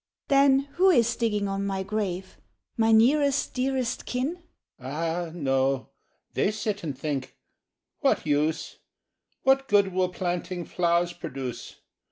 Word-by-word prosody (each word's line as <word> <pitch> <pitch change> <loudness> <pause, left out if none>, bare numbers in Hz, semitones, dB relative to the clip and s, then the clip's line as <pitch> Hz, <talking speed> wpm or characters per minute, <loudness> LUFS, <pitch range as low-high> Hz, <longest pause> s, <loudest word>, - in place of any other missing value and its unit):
'" - - -66
"Then 275 -1 +5 0.2
who 380 +2 +6
is 235 -9 +4
digging 210 -3 0
on 195 0 -2
my 195 -1 -2
grave? 190 -2 -3 0.4
My 225 0 +3
nearest 280 +5 +3
dearest 255 -2 -1
kin?" 275 +8 -2 0.4
—"Ah, 165 +6 -3
no; 135 -4 0 0.4
they - - +2
sit 210 -1 -3
and 145 -5 -4
think, 145 -3 -4 0.6
'What - - +1
use! 150 +2 0 0.7
What 270 0 +3
good 200 -2 +3
will 185 0 +1
planting 180 -1 -3
flowers 175 0 +1
produce? 130 -7 -7
195 Hz, 130 wpm, -26 LUFS, 165-240 Hz, 0.7 s, who